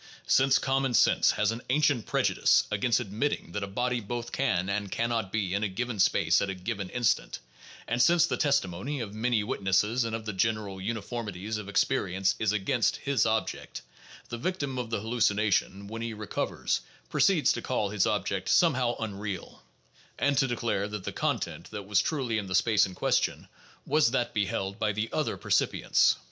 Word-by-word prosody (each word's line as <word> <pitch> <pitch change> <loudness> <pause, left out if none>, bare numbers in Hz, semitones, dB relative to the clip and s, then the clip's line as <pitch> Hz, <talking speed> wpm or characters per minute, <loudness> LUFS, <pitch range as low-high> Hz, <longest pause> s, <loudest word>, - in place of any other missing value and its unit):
Since 135 0 +4
common 135 -2 0
sense - - +4
has 105 +1 +1
an 115 +1 -5
ancient 140 -4 +2
prejudice - - +3
against 110 +3 +2
admitting 105 0 -2
that 105 - -3
a 100 - -3
body 125 +5 -1
both 120 +3 -5
can 110 -10 0
and 100 -1 -2
can 115 +1 0
not 115 -5 -2
be 100 -4 -1
in 100 +1 0
a - - +2
given 115 +3 -4
space - - +3
at 100 - -1
a 95 - -3
given 95 +1 -4
instant, 120 0 0 0.5
and 120 +1 +1
since 170 +2 +5
the - - -1
testi 140 -8 +2
mony 120 +12 -5
of 105 -4 -5
many 110 0 0
witnesses 105 +1 +1
and 115 -1 -2
of 110 -1 -6
the 105 - -3
general 100 -1 -1
uniformities 110 -1 -4
of 105 - -8
experi 100 -2 0
ence 95 0 +2
is 110 -2 +1
against 110 +4 +1
his 140 -5 0
object, 110 0 -2 0.5
the 120 - -5
victim 140 -5 -2
of 120 -2 -4
the 115 -3 -2
hallucination, 105 -3 +1
when 115 +2 -6
he 115 -1 -4
recovers, 105 -1 -2 0.3
proceeds - - +3
to - - -4
call 105 - -1
his 105 -1 +2
object 100 -3 -1
somehow 130 -8 +3
"unreal," 100 -3 -5 0.6
and 145 0 +1
to 135 - +3
de 120 - -1
clare 105 -4 -1
that 105 -2 -6
the - - -4
"content" - - -2
that 105 -2 -7
was 100 0 +3
truly 125 -5 -1
in 100 - -6
the 90 - -2
space 110 +1 +4
in 95 - -10
question - - 0 0.4
was 155 -6 +3
that 120 -1 -1
beheld 100 -1 -2
by 110 - +1
the 105 +2 -3
other - - -1
percipients. - - +2
110 Hz, 190 wpm, -28 LUFS, 100-120 Hz, 0.6 s, since